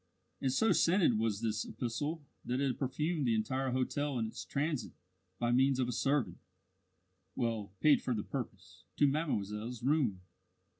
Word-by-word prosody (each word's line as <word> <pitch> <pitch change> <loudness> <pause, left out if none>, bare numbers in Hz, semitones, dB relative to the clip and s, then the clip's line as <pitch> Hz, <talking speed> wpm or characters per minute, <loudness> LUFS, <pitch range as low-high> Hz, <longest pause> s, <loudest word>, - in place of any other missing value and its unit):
And 135 - +1
so 220 +12 +3
scented 170 - +4
was 110 -2 0
this 110 -1 0
epistle 145 +6 -3 0.2
that 125 +1 -1
it 135 -2 0
perfumed 150 +2 0
the 115 - +3
entire 130 +5 0
hotel 130 +2 -1
in 115 - 0
its 110 - -6
transit 145 -5 -2 0.4
by 120 +2 +1
means 130 +2 +4
of 130 -2 +1
a - - -1
servant 130 -6 0 1.0
(well 115 -4 -1
paid 150 -2 +6
for 125 - -1
the 105 - -2
purpose) 95 -8 -7
to 145 - +5
mademoiselle's 120 -6 -1
room. 130 -9 +2
125 Hz, 155 wpm, -33 LUFS, 110-145 Hz, 1.0 s, paid